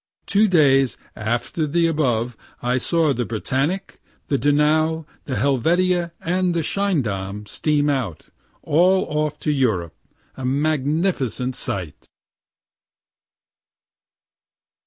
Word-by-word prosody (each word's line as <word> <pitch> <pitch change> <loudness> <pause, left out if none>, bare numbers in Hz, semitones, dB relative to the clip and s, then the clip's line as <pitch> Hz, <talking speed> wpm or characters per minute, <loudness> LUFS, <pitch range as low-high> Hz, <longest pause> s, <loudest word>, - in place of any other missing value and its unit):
Two 210 +2 +3
days 135 - +4 0.2
after 120 +8 -2
the 170 +3 +2
above 125 -7 0 0.2
I 125 +1 0
saw 160 +2 +1
the 125 - -1
"Britannic," 135 - -2 0.3
the 140 - +2
"Donau," 155 +3 +2 0.2
the 130 - -3
"Helvetia" 170 - +1
and 180 +1 0
the 165 - 0
"Schiedam" 105 - -1
steam 145 +6 0
out, 130 - -2 0.3
all 180 +5 +3
off 150 0 -2
for 150 - +1
Europe 105 - 0 0.4
a 130 - -8
magnificent 140 - 0
sight. 90 -7 -4
145 Hz, 100 wpm, -22 LUFS, 125-165 Hz, 0.4 s, days